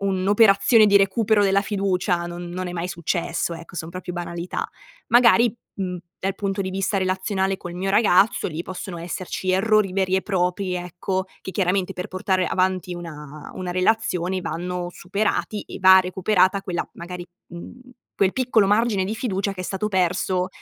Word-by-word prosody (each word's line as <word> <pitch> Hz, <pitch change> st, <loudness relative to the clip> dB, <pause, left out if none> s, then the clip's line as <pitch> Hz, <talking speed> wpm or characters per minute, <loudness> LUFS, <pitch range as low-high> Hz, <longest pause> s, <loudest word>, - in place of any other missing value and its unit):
un'operazione 200 Hz, +3 st, +4 dB
di 200 Hz, 0 st, +5 dB
recupero 205 Hz, +2 st, +3 dB
della 195 Hz, 0 st, +3 dB
fiducia, 190 Hz, -3 st, 0 dB
non 175 Hz, 0 st, -7 dB
non 185 Hz, +1 st, -4 dB
è 175 Hz, -, -5 dB
mai 175 Hz, 0 st, -3 dB
successo, 170 Hz, 0 st, -2 dB
ecco, 165 Hz, +2 st, -11 dB
son 160 Hz, 0 st, -5 dB
proprio 180 Hz, 0 st, -6 dB
banalità. 175 Hz, 0 st, -4 dB, 0.4 s
Magari, 235 Hz, -1 st, +5 dB, 0.2 s
mhmm, 180 Hz, -2 st, -3 dB, 0.2 s
dal 195 Hz, +1 st, -1 dB
punto 195 Hz, 0 st, -2 dB
di 190 Hz, -1 st, -2 dB
vista 195 Hz, +1 st, -1 dB
relazionale 190 Hz, +1 st, 0 dB
col 175 Hz, -2 st, -8 dB
mio 190 Hz, +2 st, -2 dB
ragazzo, 200 Hz, -1 st, +3 dB
lì 165 Hz, +1 st, -5 dB
possono 185 Hz, -1 st, -7 dB
esserci 185 Hz, +2 st, -3 dB
errori 210 Hz, 0 st, +3 dB
veri 190 Hz, -1 st, +1 dB
e 190 Hz, -, +2 dB
propri, 180 Hz, -1 st, -1 dB
ecco, 180 Hz, +2 st, -3 dB, 0.2 s
che 190 Hz, -, -7 dB
chiaramente 185 Hz, -1 st, 0 dB
per 180 Hz, -, -6 dB
portare 185 Hz, -1 st, 0 dB
avanti 185 Hz, 0 st, 0 dB
una 155 Hz, -4 st, -9 dB
una 180 Hz, -1 st, -4 dB
relazione 185 Hz, -1 st, 0 dB
vanno 175 Hz, +1 st, -4 dB
superati 205 Hz, +3 st, -2 dB
e -, -, -9 dB
va 190 Hz, 0 st, +8 dB
recuperata 185 Hz, +1 st, +2 dB
quella 180 Hz, -3 st, -3 dB
magari 175 Hz, +1 st, -7 dB, 0.2 s
mhmm, 175 Hz, +6 st, -10 dB, 0.4 s
quel 195 Hz, -1 st, +2 dB
piccolo 240 Hz, -5 st, +2 dB
margine 205 Hz, -1 st, +2 dB
di 205 Hz, +3 st, -3 dB
fiducia 200 Hz, -4 st, -2 dB
che 185 Hz, -, -8 dB
è -, -, -4 dB
stato 195 Hz, +3 st, -2 dB
perso 185 Hz, -1 st, 0 dB
185 Hz, 165 wpm, -23 LUFS, 180-200 Hz, 0.4 s, va